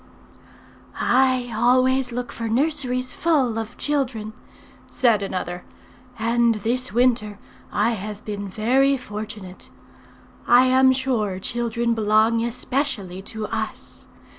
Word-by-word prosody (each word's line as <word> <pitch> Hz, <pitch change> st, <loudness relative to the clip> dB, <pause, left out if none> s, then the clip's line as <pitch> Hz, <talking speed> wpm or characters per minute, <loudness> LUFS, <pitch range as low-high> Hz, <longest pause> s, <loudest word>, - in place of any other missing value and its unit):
"I 255 Hz, -1 st, +2 dB
always 255 Hz, +2 st, +3 dB
look 245 Hz, 0 st, -4 dB
for 230 Hz, -1 st, -4 dB
nurseries 255 Hz, -1 st, 0 dB
full 270 Hz, -9 st, +1 dB
of 225 Hz, +1 st, -7 dB
children," 250 Hz, -7 st, -2 dB, 0.6 s
said 230 Hz, -5 st, +2 dB
another; 180 Hz, -2 st, -4 dB, 0.5 s
"and 235 Hz, +1 st, +2 dB
this 240 Hz, +5 st, -2 dB
winter 235 Hz, -3 st, +1 dB, 0.3 s
I 215 Hz, +3 st, +2 dB
have 210 Hz, -1 st, -6 dB
been 205 Hz, -2 st, -5 dB
very 260 Hz, +7 st, +2 dB
fortunate. 210 Hz, -5 st, -8 dB, 0.8 s
I 245 Hz, +2 st, +6 dB
am 260 Hz, 0 st, +5 dB
sure 250 Hz, -7 st, -1 dB
children 235 Hz, +2 st, -1 dB
belong 220 Hz, +1 st, +2 dB
especially 235 Hz, -6 st, -2 dB
to 215 Hz, +2 st, -6 dB
us. -, -, -6 dB
235 Hz, 110 wpm, -23 LUFS, 215-255 Hz, 0.8 s, I